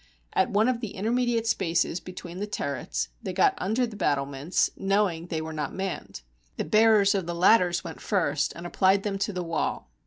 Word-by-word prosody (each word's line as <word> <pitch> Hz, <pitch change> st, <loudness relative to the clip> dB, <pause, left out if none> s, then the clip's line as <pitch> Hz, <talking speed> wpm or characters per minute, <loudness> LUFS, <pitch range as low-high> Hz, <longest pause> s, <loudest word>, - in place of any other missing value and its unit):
At -, -, +2 dB
one 215 Hz, +3 st, +3 dB
of 255 Hz, -2 st, +1 dB
the 225 Hz, -5 st, -5 dB
intermediate 235 Hz, +2 st, 0 dB
spaces 170 Hz, -5 st, +1 dB
between 180 Hz, -1 st, -9 dB
the 205 Hz, -, -3 dB
turrets -, -, -3 dB
they -, -, -4 dB
got 400 Hz, -2 st, +4 dB
under 225 Hz, +6 st, +1 dB
the 225 Hz, -3 st, -8 dB
battlements, 140 Hz, -2 st, 0 dB
knowing 195 Hz, -4 st, 0 dB
they 160 Hz, -2 st, -2 dB
were 160 Hz, 0 st, -6 dB
not 150 Hz, -1 st, -4 dB
manned. 190 Hz, -, -5 dB, 0.3 s
The -, -, -1 dB
bearers 215 Hz, -2 st, +5 dB
of 190 Hz, -4 st, -2 dB
the 170 Hz, -, -3 dB
ladders 175 Hz, -1 st, +4 dB
went -, -, -8 dB
first 165 Hz, -8 st, 0 dB
and 170 Hz, -, -8 dB
applied 190 Hz, +2 st, +2 dB
them 200 Hz, -2 st, -2 dB
to 205 Hz, +1 st, -1 dB
the 180 Hz, -2 st, -3 dB
wall. 165 Hz, -, -3 dB
190 Hz, 190 wpm, -27 LUFS, 170-210 Hz, 0.3 s, bearers